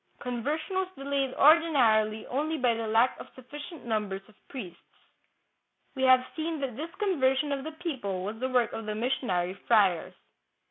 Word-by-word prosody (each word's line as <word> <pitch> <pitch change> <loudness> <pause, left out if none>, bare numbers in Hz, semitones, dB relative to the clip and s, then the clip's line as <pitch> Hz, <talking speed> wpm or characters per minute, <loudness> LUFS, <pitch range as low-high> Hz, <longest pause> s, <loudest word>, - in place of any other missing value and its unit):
Conversion 285 - -3
was 380 -1 +1
delayed 275 -1 -1
ordinarily 245 -9 +4
only 305 +5 -1
by 250 -3 +2
the 225 -1 -3
lack 225 +4 +2
of - - -9
sufficient 290 +5 -10
numbers 210 -4 -2
of 215 - -19 0.2
priests. 190 -11 -8 1.1
We 265 - -5
have 255 -1 +6
seen 320 0 -3
that 260 -4 -3
this 310 +6 -5
conversion 295 -8 +1
of 275 -1 -2
the 315 +1 -6
people 265 - -4
was 210 +3 -5
the 260 +1 -1
work 250 -2 +1
of 225 -1 -6
the 210 - -2
missionary 210 -7 -1
friars. 195 -5 +2
255 Hz, 165 wpm, -28 LUFS, 220-295 Hz, 1.1 s, have